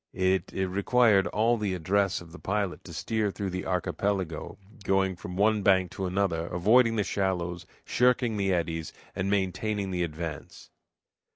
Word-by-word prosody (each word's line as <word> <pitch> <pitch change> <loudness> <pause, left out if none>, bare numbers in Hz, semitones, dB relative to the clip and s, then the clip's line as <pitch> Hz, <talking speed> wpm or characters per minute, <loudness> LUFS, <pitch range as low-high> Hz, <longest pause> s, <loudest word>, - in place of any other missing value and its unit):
It 95 -1 +1
required 100 +2 +3
all 115 +3 +2
the 100 -4 -1
address 100 +3 +1
of 85 -1 -13
the 90 - -11
pilot 100 -2 -2
to - - -9
steer 110 -2 -1
through 100 -1 -4
the 90 +1 -4
archipelago, 95 -2 -2 0.3
going 95 -1 +1
from 90 +1 -8
one 105 +1 +3
bank 95 -3 +3
to 95 -2 -3
another, 90 -3 0
avoiding 115 +7 +4
the 105 - +1
shallows, 90 -3 -2 0.2
shirking 125 -2 +2
the 100 -2 0
eddies, 80 -2 -2 0.2
and 95 +1 -1
maintaining 100 +1 -1
the 90 -1 -1
advance. 80 -2 -6
95 Hz, 155 wpm, -28 LUFS, 90-105 Hz, 0.3 s, avoiding